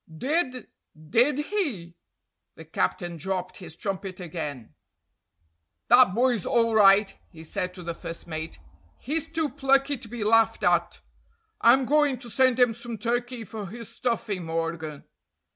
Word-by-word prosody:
"Did, 260 - -1 0.4
did 255 +5 +4 0.2
he?" 210 - -2 0.6
The - - -12
captain 175 -4 -2
dropped 185 +1 -4
his 165 -4 -9
trumpet 195 -2 -5
again. 150 -9 -6 1.2
"That 245 -6 +6
boy's 240 -4 +2
all 230 -1 +2
right," 200 -1 +5
he 160 -3 -13
said 180 +3 -4
to 180 - -9
the 170 0 -4
first 165 0 -8
mate. 160 -1 -6 0.4
"He's 320 +4 -3
too 320 -1 -1
plucky 275 0 +1
to 225 - -9
be 230 -1 -5
laughed 225 +1 +3
at. - - +1 0.6
I'm 255 +3 +5
going 290 -1 +3
to 240 -1 -12
send 255 0 +3
him 245 -2 +4
some 235 0 -7
turkey 240 +1 -2
for 210 -1 -7
his 230 +3 -9
stuffing, 220 -6 -2
Morgan. 165 -2 -4
225 Hz, 145 wpm, -26 LUFS, 180-255 Hz, 1.2 s, That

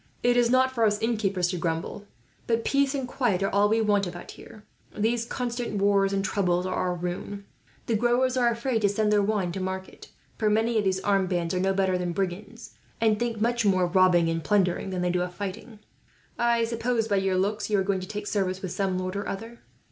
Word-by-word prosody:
It 245 0 +3
is 240 -1 +3
not 260 +1 +3
for 235 -3 0
us 210 -1 +2
innkeepers 205 -6 0
to 180 -1 -3
grumble, 165 +5 -3 0.4
but 230 -1 0
peace 280 0 +2
and 265 -2 -3
quiet 225 -8 0
are - - 0
all 205 +1 +4
we 225 +1 +2
want, 205 -3 +2
about 175 0 -8
here. 215 - -14 0.3
These 230 +2 0
constant 240 -3 -3
wars 200 -1 +3
and 195 0 -1
troubles 180 -2 0
are 185 - -2
our 180 -1 -1
ruin. 180 +3 -5 0.4
The 230 - -1
growers 245 +3 +2
are 245 -2 +3
all 235 - +3
afraid 235 0 -1
to 205 - +3
send 210 +1 +1
their 205 - +4
wine 200 -3 0
to 190 - -5
market; 190 0 -6 0.3
for 215 - +2
many 220 +2 +2
of - - 0
these 190 0 0
armed 195 -2 +1
bands 175 -2 -1
are 180 - 0
no 190 +1 +1
better 190 -2 +1
than 175 -1 -2
brigands, 200 +5 -4 0.3
and 220 -2 +2
think 235 -2 -2
much 235 +2 +1
more 190 -3 +3
of 175 +1 -2
robbing, 180 -3 +5
and 165 0 -1
plundering, 195 -2 +1
than 180 -1 -2
they 180 - +1
do 180 0 0
of 180 0 -4
fighting. 205 +3 -6 0.6
I 235 -1 +2
suppose, 230 0 -1
by 200 -2 +1
your 190 -1 +1
looks, 205 +4 -1
you 210 - +2
are 195 - +2
going 195 0 0
to 185 - -7
take 210 +1 -5
service 190 -2 -1
with 185 - -4
some 190 -1 -1
lord 185 +1 -3
or 200 - -3
other?" 225 +4 -7
200 Hz, 230 wpm, -26 LUFS, 185-230 Hz, 0.6 s, robbing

